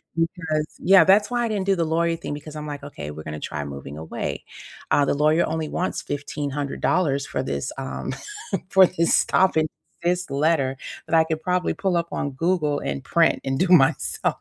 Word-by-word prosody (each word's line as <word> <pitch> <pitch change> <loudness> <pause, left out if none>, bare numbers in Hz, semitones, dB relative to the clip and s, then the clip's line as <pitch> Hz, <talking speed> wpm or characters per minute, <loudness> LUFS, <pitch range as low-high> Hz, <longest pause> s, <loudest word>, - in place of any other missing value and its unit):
because 165 -2 -1
yeah, 190 -2 +7
that's 200 +4 +4
why 240 0 +1
I - - 0
didn't 205 -4 -2
do 195 0 +3
the 170 -2 0
lawyer 165 +1 +1
thing 165 -3 -6
because 150 +1 -8
I'm 150 0 -6
like, 145 -1 -6
"Okay, 75 - -7
we're 80 +1 -8
gonna 75 0 -6
try 75 0 -4
moving 70 +1 -8
away." 80 0 -5 0.5
Uh, 145 - +4
the - - +1
lawyer 155 +3 +3
only 160 -1 -2
wants 185 - -2
$1,500 145 +1 -1
for - - -2
this, 70 0 -3
um, 135 0 -4 0.6
for 190 -1 +7
this 170 -2 +2
stop 190 0 +3
and 155 0 +3 0.4
desist 175 -2 0
letter 140 -2 +1 0.3
that - - +1
I 160 - +6
could 160 -1 -3
probably 180 +1 0
pull 185 -3 0
up 170 - -1
on 145 - -2
Google 150 0 0
and 135 - -4
print 165 +3 +3
and 135 0 -1
do 185 - +2
myself. 150 -7 +3
155 Hz, 195 wpm, -23 LUFS, 140-175 Hz, 0.6 s, yeah